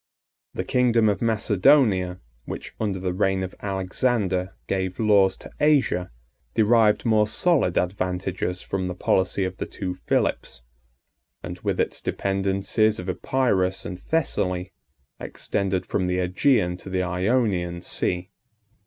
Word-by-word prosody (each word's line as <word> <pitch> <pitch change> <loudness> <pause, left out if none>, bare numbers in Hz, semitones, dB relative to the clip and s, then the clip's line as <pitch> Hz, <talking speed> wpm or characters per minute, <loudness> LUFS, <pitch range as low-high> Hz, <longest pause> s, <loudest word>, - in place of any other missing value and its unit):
The - - -2
kingdom 120 -3 +3
of 100 - -1
Macedonia, 105 -3 +3 0.2
which, - - -7
under 105 -3 -1
the 90 -1 -2
reign 95 0 +1
of 95 - -5
Alexander, 95 -1 -1
gave 95 -1 -2
laws 100 -4 +4
to - - -11
Asia, 140 -12 +2 0.5
derived 110 -1 +4
more 110 -2 +3
solid 135 - +2
advantages 90 0 -2
from 95 -1 -2
the 90 - -4
policy 95 +2 +1
of 95 0 -3
the - - -4
two 95 -2 -4
Philips; - - -1 0.8
and - - -6
with - - -2
its - - -1
dependencies 100 +2 0
of 90 +1 -5
Epirus 95 -4 0
and 90 - -6
Thessaly, 90 - -1 0.5
extended 95 -2 -2
from 95 -2 -1
the 90 0 0
Ægean 90 0 +1
to 95 - -9
the 95 -1 0
Ionian 90 -2 0
Sea. 90 +2 -2
95 Hz, 130 wpm, -24 LUFS, 90-110 Hz, 0.8 s, laws